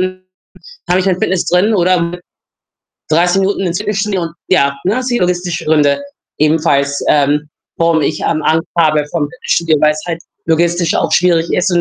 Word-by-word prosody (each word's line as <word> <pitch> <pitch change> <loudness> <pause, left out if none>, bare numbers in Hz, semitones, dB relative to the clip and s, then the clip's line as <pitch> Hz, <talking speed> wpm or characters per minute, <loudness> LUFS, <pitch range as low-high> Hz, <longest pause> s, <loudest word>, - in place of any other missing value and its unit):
dann 185 0 -3 0.7
habe 185 - +3
ich 185 - -2
mein 185 -2 +1
Fitness 185 -1 0
drin 190 +5 +2
oder 180 -1 +2
mit 170 +1 -4 0.9
30 175 +4 +2
Minuten 195 +1 0
ins 175 -2 -1
Fitnessstudio 210 -2 -1
und 165 -2 -6
ja, 140 -6 +2
ne, 220 +7 +1
sind 245 -1 -1
logistische 180 -1 -2
Gründe 150 - +2 0.4
ebenfalls, 150 -2 +1
ähm, 150 +1 +2 0.3
warum 165 -1 +2
ich, 155 - -1
ähm, 155 -1 0
Angst 160 +1 +1
habe 155 -3 +3
vorm 155 -3 -1
Fitnessstudio, 170 -10 0
weil's 155 0 +2
halt 165 -1 -4 0.2
logistisch 170 +1 +1
auch - - 0
schwierig 170 -2 +2
ist 185 +2 +1
und 175 - +2
170 Hz, 175 wpm, -14 LUFS, 155-185 Hz, 0.9 s, habe